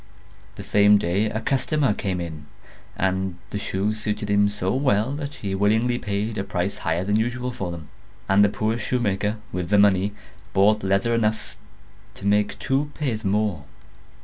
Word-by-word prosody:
The - - -8
same 105 0 +5
day 95 +3 +1
a 110 - -2
customer 135 0 +1
came 95 -3 -2
in, 80 -3 -6 0.5
and 95 -1 -1
the 105 - -3
shoes 105 +2 -2
suited 105 -1 -2
him 100 0 +4
so 100 -2 -2
well 125 -3 +2
that 145 0 -5
he 100 -2 -4
willingly 110 +5 +2
paid 105 +2 -2
a - - -1
price 100 -1 -2
higher 80 +2 -1
than 105 +3 +1
usual 125 +2 -2
for 100 -7 -4
them; 85 -3 -7 0.4
and 100 +1 +5
the 105 - +4
poor 110 +3 -1
shoemaker, 105 -2 -1
with 90 -1 -3
the 105 - +4
money, 100 0 +4 0.4
bought 105 +2 +4
leather 100 +4 +1
enough 110 -1 -1 0.6
to - - -10
make 105 0 +2
two 140 +2 0
pairs 120 -8 -2
more. 100 -6 0
105 Hz, 170 wpm, -24 LUFS, 95-110 Hz, 0.6 s, same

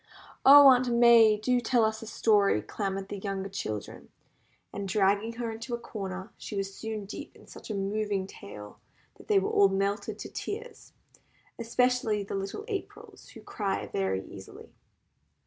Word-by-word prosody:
"Oh, 285 +1 +9
Aunt 255 -1 +4
May! 235 -2 +6
do 245 +3 +1
tell 235 -1 +2
us 220 0 -2
a 225 - -9
story," 205 - +2
clamoured 195 - -4
the 205 - -5
younger 195 -1 -4
children, 110 - -6 0.6
and 200 -1 -4
dragging 205 +3 +1
her 230 -1 -4
into 230 +2 -5
a - - -8
corner 190 -3 -7
she 210 - -7
was 195 0 -3
soon 220 -1 -6
deep 200 - -9
in - - -17
such - - -12
a 215 - -3
moving 200 0 -2
tale 105 - -11 0.4
that - - -15
they 205 - +3
were 195 - +1
all 200 -1 +5
melted 200 +1 -2
to - - -8
tears, 460 +3 -7 0.7
especially 235 -2 +1
the 195 - -7
little 195 - -4
Aprils, 405 -4 -7
who - - -11
cry 195 -3 -3
very 95 0 -2
easily. 95 - -12
210 Hz, 165 wpm, -28 LUFS, 195-230 Hz, 0.7 s, Oh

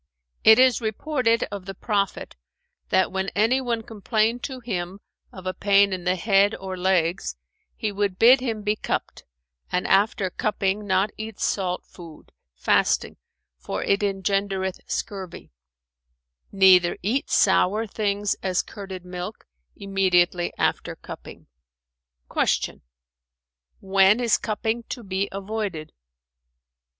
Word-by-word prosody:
It 220 0 +8
is 255 -2 +4
reported 230 +1 0
of 200 -2 -6
the 195 - -6
Prophet 200 -1 -2 0.5
that, 190 - +2
when 190 +1 -2
anyone 235 +1 +1
complained 220 +2 -1
to 260 -2 -6
him 195 -5 -4 0.3
of 185 -1 -11
a 185 - -2
pain 200 +1 +3
in 180 -1 -5
the 180 +1 +2
head 200 +2 +3
or 190 -1 -6
legs, 180 - 0 0.4
he 215 - -2
would 200 -2 -1
bid 245 +5 +7
him 225 -4 -3
be 210 +1 +1
cupped - - -4 0.5
and 180 - 0
after 195 -1 +2
cupping 205 0 -1
not 190 +2 +2
eat 220 -1 -7
salt 180 -2 -1
food, 165 -4 -14 0.2
fasting, 60 - +1 0.4
for - - -4
it 200 - +2
engendereth 195 -1 -1
scurvy; 190 - -5 1.0
neither 185 -3 +5
eat 240 +8 -1
sour 205 +3 +3
things 205 -1 -1
as 185 -2 0
curded 190 -3 -8
milk[FN#408] 180 - -9
immediately 180 -3 +2
after - - -1
cupping." - - -11 0.9
Q - - 0 1.0
"When 195 +3 +4
is 235 -3 +2
cupping 220 +2 -2
to 240 - -6
be 195 0 -2
avoided?" 195 -5 -4
195 Hz, 120 wpm, -24 LUFS, 185-215 Hz, 1.0 s, It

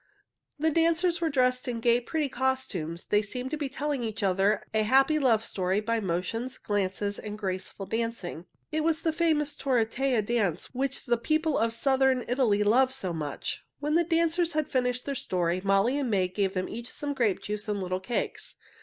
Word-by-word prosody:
The 315 +2 +1
dancers 335 +2 +2
were 330 - +2
dressed 255 -3 +1
in 240 -2 -2
gay, 235 +1 +3
pretty 300 +5 -1
costumes. 240 - -2
They 210 - +3
seemed 250 +5 -5
to - - 0
be 290 -2 -3
telling 285 0 -2
each 220 -2 -4
other 195 +2 +2
a 220 - +3
happy 270 +7 +4
love 230 -6 +3
story 190 -2 0
by 230 +2 0
motions, 215 +7 -2
glances, 205 0 -2
and 210 0 -6
graceful 190 -1 -4
dancing. 225 -7 -3 0.2
It 310 0 0
was 330 0 +1
the 320 - +1
famous 310 -3 +3
tarantella 250 -1 +1
dance 205 -6 -1
which 270 +1 -2
the 240 -1 +2
people 310 +5 +1
of 230 0 +2
Southern 265 +1 +2
Italy 235 -5 +2
love 255 +5 +4
so 195 -10 -2
much. 150 -3 -4 0.2
When 295 +1 -1
the 340 +2 +4
dancers 335 +1 +1
had 310 -1 -1
finished 250 -1 0
their 280 - -2
story, 180 -7 -1
Molly 200 +8 +3
and 270 -4 -1
May 190 -4 +2
gave 195 +1 -1
them 185 0 -1
each 235 +2 -6
some 290 -1 -3
grape 230 -8 +1
juice 210 +1 -4
and 205 -1 -1
little 185 -1 -2
cakes. 235 +6 -3
240 Hz, 190 wpm, -28 LUFS, 205-280 Hz, 0.2 s, happy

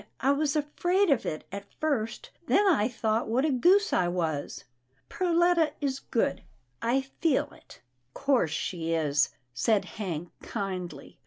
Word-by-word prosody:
I 270 +3 +3
was 290 +1 +1
afraid 350 +5 +1
of 270 - +1
it 155 - -3
at 200 +1 -8
first, 230 -8 -2 0.2
then 410 - +4
I 250 - +4
thought 225 -1 -1
what 245 +6 +1
a 310 - +2
goose 370 - +4
I 175 - +3
was. 165 -5 -2 0.5
Perletta 345 -2 +2
is 275 -2 -1
good. 230 - -1 0.4
I 245 +4 +2
feel 285 +1 0
it." - - -17 0.2
" 125 +1 -46
'Course 270 - +2
she 165 +1 -2
is," 145 -3 +2 0.2
said 200 - +2
Hank, 175 -5 -5
kindly. 180 -10 -5
235 Hz, 150 wpm, -28 LUFS, -, 0.5 s, then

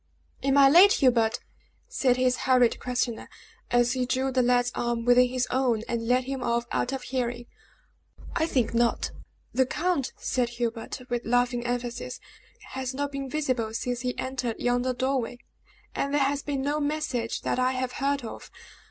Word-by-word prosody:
"Am 275 +1 +2
I 275 -1 +8
late 355 +8 +8
Hubert?" 235 -5 +2 0.5
said 255 -2 +1
his 255 0 +2
hurried 250 -2 +4
questioner, 250 -2 -2 0.4
as 240 0 +3
he 255 -1 -1
drew 260 +1 0
the 260 0 +2
lad's 245 0 +2
arm 235 -1 -2
within 245 +1 +6
his 250 0 0
own, 250 -4 +1
and 230 -1 -2
led 250 +1 +3
him 265 0 -4
off 235 -1 0
out 245 - 0
of 270 -1 -4
hearing. 240 -2 -3 0.9
"I 320 - +1
think 250 -8 0
not. 235 0 +1 0.4
The 260 0 +2
count," 345 -3 -1
said 245 -2 -1
Hubert, 235 +1 -3
with 240 0 -1
laughing 245 0 +1
emphasis, 245 +1 -3 0.5
"has 260 0 -4
not 285 +1 -2
been 275 -1 -5
visible 255 -6 -1
since 245 +1 -2
he 250 0 -3
entered 255 -3 -3
yonder 245 +1 +1
doorway, 255 -1 -1 0.6
and 280 - -2
there 290 0 +2
has 280 +1 0
been 280 -2 -3
no 290 +2 0
message 290 -6 -2
that - - -1
I 255 +1 +2
have 255 -1 -2
heard 280 0 -1
of. - - -8
250 Hz, 170 wpm, -27 LUFS, 240-270 Hz, 0.9 s, I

